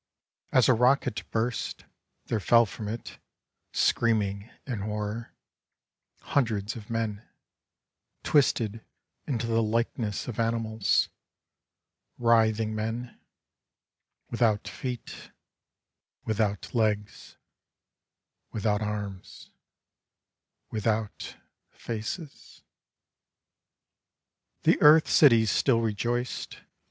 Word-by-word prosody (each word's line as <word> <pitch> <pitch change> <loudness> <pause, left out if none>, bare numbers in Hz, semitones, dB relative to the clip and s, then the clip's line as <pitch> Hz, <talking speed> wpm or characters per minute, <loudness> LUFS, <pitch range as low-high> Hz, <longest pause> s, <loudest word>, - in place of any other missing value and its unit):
As 130 -3 +5
a 130 - +6
rocket 125 0 +1
burst 115 0 -2 0.4
There 115 - -1
fell 115 +3 +5
from 105 +1 -7
it, 115 +3 -6 0.5
Screaming 105 -2 +1 0.2
in 125 -6 -4
horror, 105 +2 -4 0.9
Hundreds 110 -6 -1
of 110 -3 -10
men, 110 -3 -2 1.0
Twisted 115 -7 +2 0.4
into 120 -4 -1
the 115 0 +1
likeness 110 -1 -1
of 120 -3 -5
animals 115 -2 +1 0.5
— - - -56
Writhing 110 -2 +3
men 115 +3 -4 1.1
Without 115 -3 +1
feet, 125 -3 -5
10 - - -9
Corpse - - -12
Day. - - -28 0.9
Without 105 -2 -1
legs, 105 -3 -1 1.1
Without 105 0 0
arms, 105 -3 -6 1.2
Without 110 0 -2 0.3
faces 115 +8 -7 0.9
—... - - -56
The - - +3
earth 155 +1 +7
cities 115 -8 +5
still 120 -4 +3
rejoiced. 120 +3 -2
115 Hz, 90 wpm, -27 LUFS, 105-120 Hz, 1.2 s, earth